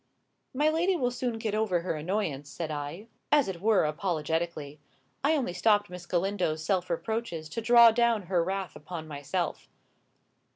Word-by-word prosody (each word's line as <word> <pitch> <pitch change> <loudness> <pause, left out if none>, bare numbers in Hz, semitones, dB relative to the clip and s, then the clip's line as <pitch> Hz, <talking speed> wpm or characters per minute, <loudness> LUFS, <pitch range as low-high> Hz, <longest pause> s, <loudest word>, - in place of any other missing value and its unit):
"My 295 +3 +3
lady 335 +4 +2
will 245 -7 0
soon 245 -1 -2
get 220 -2 -3
over 210 -5 +1
her 175 - -2
annoyance," 155 -3 -2
said 160 +2 -5
I, 150 +7 -5 0.3
as 295 -2 +5
it 180 -3 -5
were 215 -4 +4
apologetically. 155 -2 -2 0.4
I 305 +3 +3
only 255 - -1
stopped 205 +1 +2
Miss 180 -1 -9
Galindo's 175 -4 -1
self 180 -1 0
reproaches 175 -3 -3
to 230 - -4
draw 235 0 +8
down 230 -2 +2
her 175 -1 +1
wrath 190 -1 -3
upon 160 +1 -7
myself. 155 +4 -3
185 Hz, 160 wpm, -28 LUFS, 160-225 Hz, 0.4 s, draw